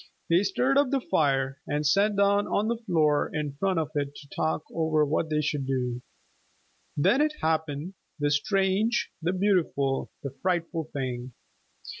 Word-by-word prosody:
They 170 +2 +5
stirred 250 +8 +2
up 285 -2 +2
the 275 0 +1
fire, 135 - 0
and 150 +1 -1
sat 200 +7 +3
down 200 0 +3
on 210 +2 0
the 235 - 0
floor 155 -4 +2
in 150 -2 -3
front 190 0 +1
of 155 -2 -1
it 145 -1 -2
to 145 - -12
talk 160 0 0
over 160 -2 +2
what 155 +2 -1
they 150 -1 +1
should 145 -2 -2
do. 125 -2 -1 1.0
Then 240 - +4
it 305 0 +1
happened, 160 +1 -1 0.2
the 145 -1 0
strange, 195 +8 +1
the 170 +2 0
beautiful, 180 -8 +1
the 140 - -4
frightful 170 -3 -1
thing! 130 -2 -4
160 Hz, 160 wpm, -27 LUFS, 145-195 Hz, 1.0 s, They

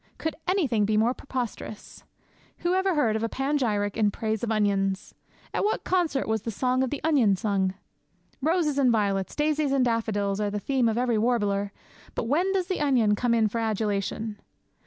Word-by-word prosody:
Could 320 - -3
anything 290 - +2
be 215 +1 +1
more 230 +3 +3
preposterous? 245 -5 -6 0.6
Who 350 +1 +1
ever 380 -1 +2
heard 230 -8 +2
a 225 +1 -1
panegyric 240 -8 0
in 215 -2 +3
praise 220 +1 -3
of 230 - -1
onions? 195 -3 0 0.4
At - - 0
what 420 - 0
concert 345 -7 0
was 220 -1 0
the 230 - -4
song 255 +4 0
of 260 - +1
the 290 - -5
onion 270 -11 +4
sung? 190 -1 0 0.7
Roses 310 -1 +1
and 260 -3 +4
violets, 200 -4 0
daisies 300 -1 +1
and 270 -2 +3
daffodils, 210 -4 0
are 205 - 0
the 205 +1 -3
theme 255 +1 +1
of 225 - -1
every 240 -3 +1
warbler; 205 -4 +1 0.4
but - - -1
when 320 +11 +1
does 380 -2 0
the 370 -2 -2
onion 250 -8 +3
come 235 +2 +1
in 225 -2 +3
for 230 +2 -3
adulation? 215 0 -2
230 Hz, 180 wpm, -26 LUFS, 210-280 Hz, 0.7 s, onion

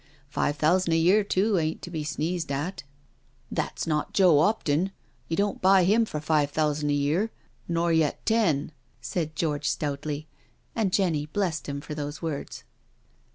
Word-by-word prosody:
Five 145 0 0
thousand 165 +3 +2
a - - +4
year 185 +6 +4
too 200 0 +2
ain't 155 0 -2
to 175 - -7
be 160 -3 -3
sneezed 155 +1 -2
at." 150 +8 -3 0.4
" - - -38 0.3
That's - - -2
not 155 -2 -1
Joe 180 -7 +6
'Opton— 170 -1 +2 0.4
you 165 - -2
don't 200 0 0
buy 190 0 +6
him 215 +5 +4
for 155 -8 -4
five 150 -1 +1
thousand 150 0 0
a - - +2
year— 155 +10 +1 0.4
nor 170 0 +1
yet 160 -2 +1
ten," 175 -11 +2 0.3
said 155 -3 -3
George 145 -3 0
stoutly, 145 +1 -3 0.5
and 215 -5 +1
Jenny 165 -7 +1
blessed 170 -3 -2
him 140 0 -4
for 150 - -7
those 145 0 -5
words. 160 -4 -5
160 Hz, 165 wpm, -26 LUFS, 150-185 Hz, 0.5 s, Joe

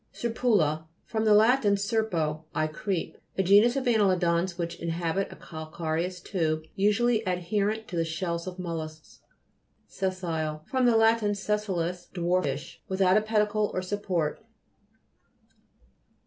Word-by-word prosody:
SER'PULA 200 -10 +1 0.2
fr. 220 - -3
lat. 220 +4 +5 0.2
serpo, 190 -8 -1
I 155 - +2
creep. 170 +3 -3 0.2
A 190 - +3
genus 205 +6 +5
of 270 - 0
anneli'dans 185 -6 +2
which 170 -1 -4
inhabit 170 +3 -2
a - - -9
calcareous 160 +2 -4
tube, 160 -4 -1
usually 215 +3 +2
adherent 200 +5 -1
to 180 - -6
the 165 - +2
shells 170 +1 -3
of 185 0 -6
mollusks. 160 -3 -6 0.7
SES'SILE 165 -5 -3
fr. 260 - -2
lat. 230 -2 +5
sessilis, 200 -4 -2
dwarfish. 170 -5 -1
Without 190 0 +3
a 215 - +5
pedicle 215 -1 +1
or 185 - -1
support. 185 -5 -2
185 Hz, 120 wpm, -27 LUFS, 165-210 Hz, 0.7 s, lat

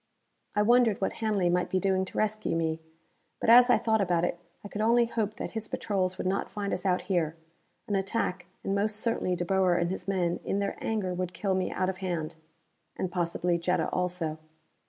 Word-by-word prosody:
I 210 - +3
wondered 235 -2 +4
what 195 - -1
Hanley 210 -5 +1
might 180 0 +1
be 185 - +1
doing 190 -1 +1
to - - -9
rescue 215 -3 0
me. 160 -1 0 0.6
But - - +3
as 245 +1 +8
I 245 - +6
thought 220 -2 +1
about 175 -2 +2
it, 175 - -3 0.2
I - - -6
could 205 +1 -4
only 235 +2 +4
hope 220 -2 -2
that - - -5
his 220 -1 -4
patrols 185 -3 -1
would - - -4
not 190 +2 0
find 205 -1 -3
us 185 - -2
out 180 -1 +1
here. 170 -4 0 0.5
An 205 - -2
attack 195 -2 -1 0.2
and 195 - -1
most 205 +2 +1
certainly 215 -4 0
De 175 - -2
Boer 185 -1 +3
and 175 0 +1
his 190 - -5
men 180 -3 0
in - - -1
their 200 0 -1
anger 205 -5 -1
would 180 0 -3
kill 195 -2 0
me 185 -1 0
out 185 - 0
of 185 0 -3
hand. 170 -4 -3 0.6
And 185 - -2
possibly 175 0 0
Jetta 180 +2 0
also. 180 -3 -2
190 Hz, 210 wpm, -29 LUFS, 180-210 Hz, 0.6 s, as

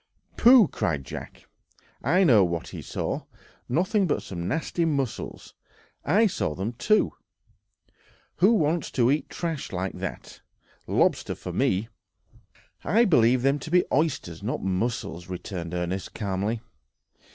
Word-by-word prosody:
"Pooh!" 240 -4 +7
cried 75 - -2
Jack, - - -8 0.6
"I 180 +7 +3
know 115 - +6
what 85 -2 -2
he - - -7
saw—nothing 185 - -2
but - - -1
some 85 -2 -5
nasty 165 - -1
mussels; 140 -7 -3 0.5
I 205 +9 +4
saw 175 - -1
them 100 +6 -3
too. 215 - +2 1.2
Who 195 +5 +5
wants 160 -5 +1
to 125 0 +3
eat 150 - -1
trash 165 -4 -4
like 95 +1 -3
that? - - -7 0.5
Lobster - - +1
for - - -7
me!" 95 +4 +1 1.0
"I 230 +3 +4
believe 125 - +4
them 140 +2 +2
to 160 - -8
be 180 +2 +4
oysters, 135 - 0
not 110 +5 -3
mussels," 95 -2 -2
returned 90 -2 -5
Ernest 90 +2 -3
calmly. 105 +2 -2
120 Hz, 130 wpm, -26 LUFS, -, 1.2 s, Pooh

